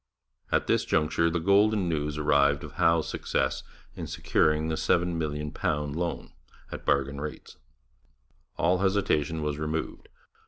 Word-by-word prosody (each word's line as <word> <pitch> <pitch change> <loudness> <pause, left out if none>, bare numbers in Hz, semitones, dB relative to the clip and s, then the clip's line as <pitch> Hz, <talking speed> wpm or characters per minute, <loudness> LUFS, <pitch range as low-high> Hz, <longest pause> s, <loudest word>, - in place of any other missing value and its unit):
At - - +2
this - - +2
juncture 80 +1 +1
the 85 +1 -1
golden 100 +2 +3
news 75 -2 -2
arrived 70 -1 +3
of 75 - -8
Howe's 85 0 +2
success - - -1 0.3
in - - -6
securing 75 0 +1
the 80 - -1
£7,000,000 75 -3 -1
loan 85 0 -4 0.4
at - - -7
bargain 70 0 0
rates. 75 0 -7 1.0
All 90 +3 +2
hesitation 80 -6 +1
was 75 -1 -2
removed. 80 +1 -4
80 Hz, 125 wpm, -27 LUFS, 75-85 Hz, 1.0 s, golden